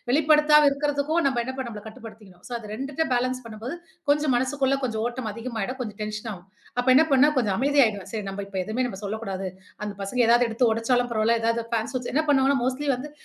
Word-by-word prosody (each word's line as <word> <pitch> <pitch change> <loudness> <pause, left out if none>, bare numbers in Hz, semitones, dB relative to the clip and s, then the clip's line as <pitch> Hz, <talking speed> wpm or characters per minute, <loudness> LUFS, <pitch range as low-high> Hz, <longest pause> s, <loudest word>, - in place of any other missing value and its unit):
வெளிப்படுத்தாம 300 +1 +5
இருக்கிறதுக்கும், 290 +3 0
நம்ப 265 -3 +1
என்ன 260 - -4
பண் 265 -2 -4
நம்பள 215 -3 -7
கட்டுப்படுத்திக்கணும். 215 -4 -12
ஸோ - - -10
அது 220 - -10
2 270 +6 -5
த்த 320 - +2
பேலன்ஸ் 255 +1 0
பண்ணும்போது 230 +6 -6 0.3
கொஞ்சம் 295 -1 +3
மனசுக்குள்ள 265 +2 +1
கொஞ்சம் 220 -3 -2
ஓட்டம் 240 -2 -4
அதிகமாயிடும். 230 +2 -4
கொஞ்சம் 215 -4 -5
டென்ஷன் 215 +1 -5
ஆகும். 180 -1 -11 0.3
அப்ப 245 +1 0
என்ன 295 +5 +7
பண்ண, 270 +1 +6
கொஞ்சம் 215 -7 +1
அமைதியாயிடுவேன். 250 -7 +2
சரி 220 -2 -3
நம்ப 195 +1 -5
இப்ப 195 -1 -9
எதுவுமே 230 +6 -1
நம்ம 195 -6 -6
சொல்லக்கூடாது. 200 -2 -4 0.4
அந்த 205 - -4
பசங்க 220 +6 0
எதாவது 240 +1 +5
எடுத்து 230 +2 +1
ஒடச்சாலும் 245 +2 +1
பரவால்ல. 225 +1 +2
எதாவது 230 0 0
ஃபேன்ஸ் 230 +1 -1
ஸ்விட்ச் 250 -1 -3
என்ன 310 - +3
பண்ணுவாங்கன்னா 275 -1 +4
மோஸ்ட்லி 265 +3 -1
வந்து, 270 +4 -7
245 Hz, 205 wpm, -25 LUFS, 220-270 Hz, 0.4 s, என்ன